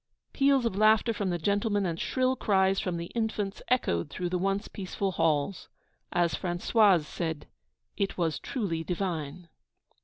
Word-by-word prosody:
Peals 275 -2 +3
of 230 - 0
laughter 215 +2 +4
from 200 -3 -2
the 175 - 0
gentlemen, 205 +3 0
and 170 -2 -2
shrill 260 0 +1
cries 195 -4 +2
from 180 -4 -2
the 170 0 -6
infants, 215 -3 -2
echoed 85 - +1
through 180 -1 -3
the 180 - 0
once 195 +2 -1
peaceful 195 0 -3
halls. 165 +1 0 0.4
As 175 -3 +1
Françoise 180 +1 +3
said 160 -1 -4 0.5
'It 200 -1 -1
was 165 -3 0
truly 180 -10 -3
divine.' 170 -3 -3
190 Hz, 150 wpm, -28 LUFS, 170-215 Hz, 0.5 s, laughter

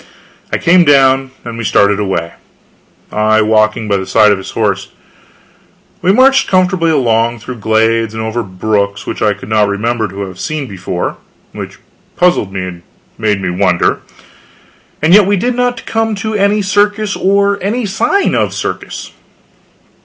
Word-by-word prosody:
I - - +1
came 175 +1 +4
down, 135 -3 +4 0.2
and 115 -1 -6
we - - -3
started 100 -1 +2
away, 90 -5 -2 0.8
I 110 +1 +2
walking 110 0 +1
by 100 -1 +1
the 95 0 -5
side 105 -1 +4
of 100 - +1
his 95 - -8
horse. 100 -3 -1 1.1
We 185 - +3
marched 265 +5 +4
comfortably 185 -2 +2
along, 120 -5 +1
through 120 +3 -8
glades 110 +1 +1
and 110 - -3
over 110 +2 -2
brooks 100 +1 -2
which - - -5
I 105 -2 +2
could 100 - -11
not 105 -1 +2
remember 110 +3 -1
to 100 +1 -8
have 95 -2 -7
seen 155 -2 -3
before 95 -5 -4 0.3
which - - -8 0.4
puzzled 175 - +2
me 95 -1 -4
and 90 -2 -7 0.4
made 105 -2 0
me 95 -2 -2
wonder 90 -1 +1 1.0
and 160 +2 +4
yet 205 -1 +6
we 200 0 +2
did 245 +7 0
not 245 0 -1
come 225 -1 -1
to 220 +2 -4
any 205 0 +1
circus 205 +1 +1
or 200 +1 +1 0.3
sign 235 - 0
of - - +1
a - - -11
circus. - - -5
115 Hz, 160 wpm, -13 LUFS, -, 1.1 s, yet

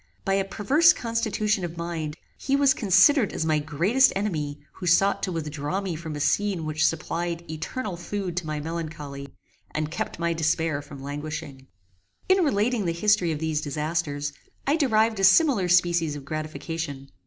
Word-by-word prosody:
By 195 - +1
a 195 0 +2
perverse 275 - +4
constitution 220 -3 -1
of 170 -1 -5
mind, 165 -2 -4 0.2
he 275 - -1
was 280 -1 +4
considered 210 - +4
as 160 - -2
my 155 -1 +2
greatest 175 - +3
enemy 155 -8 -2 0.2
who 180 - -5
sought 195 +3 +3
to 185 - -2
withdraw 155 +1 -3
me 190 -4 -3
from 160 -1 -6
a - - -5
scene 190 +2 +1
which 155 +1 -1
supplied 170 +1 -1
eternal 175 - -4
food 180 0 -4
to 175 -3 -2
my 155 -1 -2
melancholy, 150 -3 -6 0.4
and 155 0 -3
kept 170 - -4
my 170 0 0
despair 160 -2 0
from 140 -1 -11
languishing. 145 -1 -6 0.6
In 375 0 +4
relating 220 - +1
the 170 - 0
history 185 -1 +2
of 155 - -2
these 155 -1 -1
disasters 145 -1 -2 0.3
I 285 - +3
derived 220 -7 +2
a - - -1
similar 195 - +5
species 170 -3 +3
of 140 -2 -8
gratification. 155 -2 -5
170 Hz, 165 wpm, -25 LUFS, 155-205 Hz, 0.6 s, similar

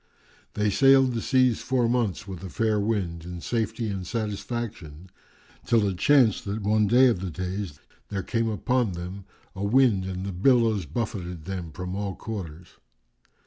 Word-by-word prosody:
They 105 0 +1
sailed 135 +2 +5
the 115 - -2
seas 130 -2 +2
four 125 -3 +1
months 115 -6 -1
with 95 -3 -7
a 95 - -6
fair 110 +4 +1
wind, 100 -6 -1
in 90 0 -7
safety 115 +1 -2
and 95 -3 -4
satisfaction 100 -6 -5 0.5
till 110 -3 +2
it 95 -3 -3
chanced 130 -6 +4
that 100 +1 -3
one 105 +1 +3
day 125 +5 +6
of 120 -8 +3
the 95 0 -4
days 90 -1 -5 0.3
there 100 -2 -3
came 115 -1 0
out - - -1
upon 120 -1 0
them 90 +3 -7 0.3
a 95 - -4
wind 110 -3 +3
and 95 0 -4
the 100 - -3
billows 110 - +3
buffeted 90 - -4
them 90 -4 -5
from 90 +3 -5
all 100 -1 -3
quarters. 90 -6 -7
100 Hz, 170 wpm, -26 LUFS, 90-115 Hz, 0.5 s, day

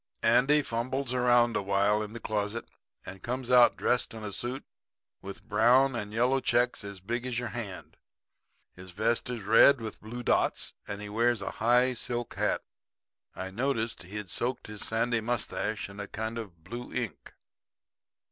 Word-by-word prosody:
"Andy 140 +5 +4
fumbles 130 +1 -2
around 120 -1 +4
awhile 100 +2 +2
in 105 0 -6
the 120 - -6
closet 105 +1 -2 0.4
and 95 0 -9
comes 125 +1 -3
out 125 -1 +6
dressed 125 -2 0
in 110 - -8
a 105 -1 -5
suit 125 +6 -4 0.6
with 100 0 -9
brown 125 +6 +4
and 105 -3 -4
yellow 125 +4 +2
checks 120 -2 +1
as 100 -1 -7
big 120 +6 -3
as 125 -2 -2
your 120 -1 -2
hand. 100 -6 -7 0.8
His 90 0 -11
vest 110 +7 0
is 120 -4 -4
red 115 +6 +6
with 110 -2 -7
blue 120 +3 -7
dots, - - +1
and 100 0 -5
he 105 - -6
wears 115 +2 +2
a 100 - -4
high 125 +3 +4
silk 120 0 -3
hat. - - 0 0.7
I 95 0 -5
noticed 115 +1 -1
he'd 100 +1 -7
soaked 125 +1 -2
his 105 -1 -7
sandy 115 +1 0
mustache 110 -2 -2
in 100 +1 -11
a 100 - -5
kind 110 +3 -4
of 90 -8 -10
blue 120 +7 -7
ink. 125 -5 -5
115 Hz, 165 wpm, -29 LUFS, 105-120 Hz, 0.8 s, out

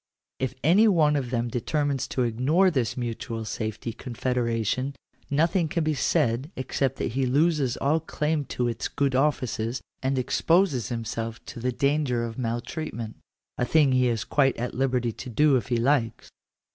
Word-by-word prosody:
If 130 0 -2
any 195 +9 +6
one 155 -7 +4
of 135 -4 -1
them 120 -1 -1
determines 135 +3 -1
to 130 - -1
ignore 140 +11 +3
this 130 -8 -1
mutual 115 -1 -4
safety 110 +1 -4
confederation, 125 +1 -1 0.3
nothing 165 +4 +2
can 165 +2 -1
be 155 0 +1
said 140 -3 +1
except 130 0 -1
that - - -2
he 130 +2 0
loses 145 -1 +2
all 150 +4 +2
claim 150 -1 -1
to 125 -2 -2
its 115 -1 -2
good 140 -2 0
offices, 130 -4 0 0.2
and 130 +1 0
exposes 145 - +2
himself 115 -1 -4
to - - -8
the 125 +2 0
danger 140 -2 +1
of 115 +1 -7
mal 120 -1 -1
treatment 120 -9 -6 0.2
— - - -63
a - - +2
thing 145 0 +4
he 130 -1 +3
is 115 -3 0
quite 135 -2 +2
at 120 +1 -3
liberty 125 -2 0
to 125 - -8
do 145 +4 +4
if 125 - 0
he 120 -1 +1
likes. 120 -2 0
130 Hz, 170 wpm, -26 LUFS, 120-150 Hz, 0.3 s, any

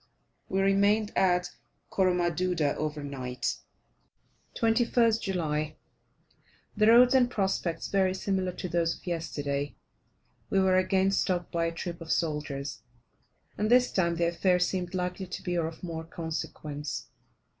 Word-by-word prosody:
We 190 +1 +1
remained 200 +2 +2
at 180 -1 +2 0.4
Coromaduda 180 -4 +1
over 150 -1 -3
night. 130 -3 -3 1.0
21st 230 0 +3
July. 155 -5 -2 1.0
The 215 0 +3
roads 245 +3 +7
and 250 -2 +4
prospects 190 -6 -1
very 190 -1 +2
similar 190 -1 -1
to 180 - -5
those 170 -1 0
of - - -21
yesterday. 145 -5 -3 0.7
We 195 - +2
were 190 -1 +4
again 190 +1 +2
stopped 180 -2 0
by 170 -1 0
a 165 - 0
troop 170 +1 -6
of 160 - -5
soldiers, 145 -3 -2 0.8
and 210 +1 +1
this 250 +1 +5
time 170 -3 +1
the 170 0 +1
affair 180 +1 +2
seemed 180 0 -1
likely 180 +1 -3
to 185 - -7
be 180 - -2
of 165 0 -3
more 165 -2 -5
consequence. 155 -3 -5
180 Hz, 135 wpm, -29 LUFS, 160-195 Hz, 1.0 s, roads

